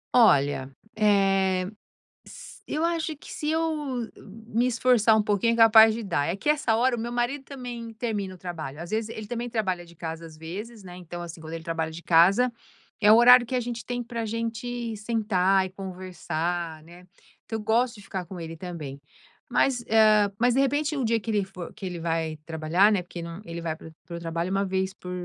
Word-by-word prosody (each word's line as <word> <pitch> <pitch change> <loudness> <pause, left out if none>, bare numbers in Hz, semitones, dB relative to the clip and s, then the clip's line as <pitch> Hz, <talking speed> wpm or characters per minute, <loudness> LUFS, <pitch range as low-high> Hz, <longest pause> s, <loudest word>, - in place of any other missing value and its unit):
Olha, 140 - +4 0.3
eh, 195 -3 +3 0.6
s - - -12
eu 315 +2 -1
acho 325 -2 -1
que - - -14
se 300 - -3
eu 325 0 +1 0.3
m 225 - -6 0.4
me 235 +2 +1
esforçar 235 -3 +4
um 215 - +4
pouquinho 210 +2 +1
é 230 - -2
capaz 225 -1 +8
de 230 - -4
dar. 170 -8 0
É 175 +4 -1
que 295 - -7
essa 285 -7 +2
hora 245 +1 +2
o - - -5
meu 235 +1 -4
marido 245 +3 -1
também 245 -4 -7
termina 210 -5 -3
o - - -12
trabalho. 160 -5 -6
Às 170 - -8
vezes 220 0 -1
ele 215 -1 -7
também 240 +1 -4
trabalha 190 -6 -2
de 170 - -16
casa, 165 0 -6
às 160 -1 -12
vezes, 205 +7 -8
né, 180 0 -9
então 175 -1 -8
assim, 170 -1 -8
quando 160 0 -9
ele 165 -1 -7
trabalha 165 -1 -2
de 165 +2 -8
casa 185 +10 +5 0.5
é 210 - +8
o - - +9
horário 245 +1 +8
que 255 - -2
a 250 - +2
gente 235 -1 -5
tem 245 0 -3
pra 230 -1 -4
gente 230 +1 -3
sentar 200 -4 +1
e 185 - -6
conversar, 175 -3 -4
né, 175 +2 -15 0.4
que - - -9
eu 220 - -2
gosto 230 +3 +1
de 205 - -12
ficar 190 -2 -5
com 180 +1 -8
ele 165 0 -6
também. 155 -6 -7 0.5
Mas, 250 -3 +2
eh, 215 -2 +5
mas 245 +1 +3
de 265 - +2
repente 290 +3 +1
no 270 - -1
dia 230 0 +2
que 225 - -8
ele 205 -2 +1
fo 180 -2 -9
que 195 - -8
ele 175 -2 -4
vai 165 -1 -2
trabalhar, 165 +5 +3
né, 205 -4 +2
porque 175 -1 -8 0.2
ele 170 0 -6
vai 165 -2 -3
para 160 - -12
o - - -15
para 170 - -7
o - - -6
trabalho 170 +1 -3
1 195 +1 +1
vez 190 0 -1
por 180 -2 -9
200 Hz, 220 wpm, -26 LUFS, 170-235 Hz, 0.6 s, o